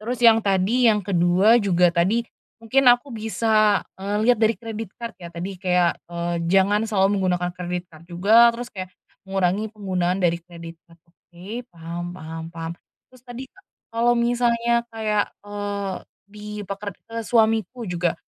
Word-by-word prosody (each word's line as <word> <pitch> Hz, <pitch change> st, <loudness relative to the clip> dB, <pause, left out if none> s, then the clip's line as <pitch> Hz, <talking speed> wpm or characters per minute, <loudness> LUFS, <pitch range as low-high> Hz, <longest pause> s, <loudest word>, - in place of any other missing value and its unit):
Terus 235 Hz, +3 st, -4 dB
yang 230 Hz, -1 st, +7 dB
tadi 205 Hz, +5 st, +2 dB
yang 210 Hz, -1 st, +1 dB
kedua 185 Hz, +4 st, +4 dB
juga 180 Hz, -3 st, +3 dB
tadi, 205 Hz, +8 st, +2 dB, 0.4 s
mungkin 260 Hz, +3 st, +3 dB
aku 245 Hz, +3 st, +2 dB
bisa, 215 Hz, -1 st, +2 dB, 0.2 s
eee, 200 Hz, +2 st, -2 dB
liat 245 Hz, -2 st, +4 dB
dari 225 Hz, 0 st, +3 dB
credit 225 Hz, -3 st, -6 dB
card 235 Hz, -1 st, -6 dB
ya, 170 Hz, -, -8 dB
tadi 175 Hz, +4 st, -6 dB
kayak, 180 Hz, -2 st, +2 dB
eee, 170 Hz, 0 st, -3 dB, 0.2 s
jangan 200 Hz, +3 st, +3 dB
selalu 200 Hz, -1 st, +2 dB
menggunakan 180 Hz, -1 st, 0 dB
credit 180 Hz, 0 st, -4 dB
card 160 Hz, 0 st, -16 dB
juga. 215 Hz, +7 st, +5 dB
Terus 245 Hz, +1 st, -6 dB
kayak 185 Hz, -1 st, -6 dB, 0.4 s
mengurangi 195 Hz, +2 st, 0 dB
penggunaan 185 Hz, -3 st, -1 dB
dari 170 Hz, -1 st, +2 dB
credit 170 Hz, -1 st, -11 dB
card. 165 Hz, 0 st, -20 dB
Oke, 180 Hz, +7 st, -10 dB
paham 170 Hz, +1 st, -6 dB
paham 160 Hz, -2 st, -8 dB
paham. 165 Hz, 0 st, -6 dB, 0.4 s
Terus 255 Hz, -1 st, -19 dB
tadi 250 Hz, +1 st, -8 dB, 0.5 s
kalau 235 Hz, +1 st, +3 dB
misalnya 235 Hz, 0 st, +1 dB
kayak, 215 Hz, -2 st, 0 dB, 0.2 s
eee, 205 Hz, -2 st, -4 dB, 0.4 s
di 210 Hz, 0 st, -11 dB, 0.2 s
peker 200 Hz, +1 st, -5 dB, 0.2 s
eee, 230 Hz, -, -2 dB
suamiku 225 Hz, 0 st, +1 dB
juga, 175 Hz, -1 st, -1 dB
200 Hz, 155 wpm, -23 LUFS, 175-230 Hz, 0.5 s, yang